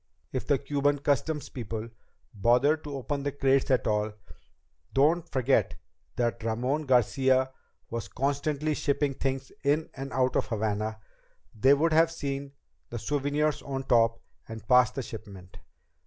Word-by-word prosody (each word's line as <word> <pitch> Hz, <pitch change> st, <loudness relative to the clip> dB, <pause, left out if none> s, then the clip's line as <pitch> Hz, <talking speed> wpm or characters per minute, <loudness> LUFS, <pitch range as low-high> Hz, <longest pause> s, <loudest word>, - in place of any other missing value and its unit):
If 130 Hz, -, -3 dB
the 145 Hz, -, +3 dB
Cuban 145 Hz, +1 st, 0 dB
customs 145 Hz, +2 st, -1 dB
people 115 Hz, -3 st, -5 dB, 0.5 s
bothered 125 Hz, +9 st, +3 dB
to 145 Hz, -1 st, -5 dB
open 140 Hz, +2 st, -3 dB
the 140 Hz, +1 st, -2 dB
crates 135 Hz, -1 st, +2 dB
at 130 Hz, -, +2 dB
all 105 Hz, 0 st, 0 dB, 0.8 s
don't 160 Hz, +5 st, +3 dB
forget 130 Hz, 0 st, +1 dB, 0.4 s
that 120 Hz, -1 st, -1 dB
Ramon 125 Hz, +7 st, -1 dB
Garcia 130 Hz, +1 st, +3 dB, 0.4 s
was 115 Hz, -3 st, -3 dB
constantly 140 Hz, +6 st, -1 dB
shipping 140 Hz, -1 st, 0 dB
things 135 Hz, 0 st, -3 dB
in 150 Hz, +3 st, +1 dB
and 135 Hz, 0 st, -6 dB
out 130 Hz, 0 st, +1 dB
of -, -, +1 dB
Havana 110 Hz, -1 st, -2 dB, 0.6 s
they 130 Hz, +6 st, +5 dB
would 160 Hz, +3 st, +2 dB
have 165 Hz, +1 st, +5 dB
seen 140 Hz, -3 st, -4 dB, 0.4 s
the 120 Hz, -, -5 dB
souvenirs 145 Hz, +3 st, 0 dB
on 135 Hz, -1 st, -4 dB
top 115 Hz, -2 st, +3 dB, 0.3 s
and 110 Hz, -2 st, -9 dB
pass 125 Hz, -1 st, +6 dB
the 130 Hz, +1 st, -5 dB
shipment. 100 Hz, -6 st, -10 dB
135 Hz, 140 wpm, -28 LUFS, 115-145 Hz, 0.8 s, pass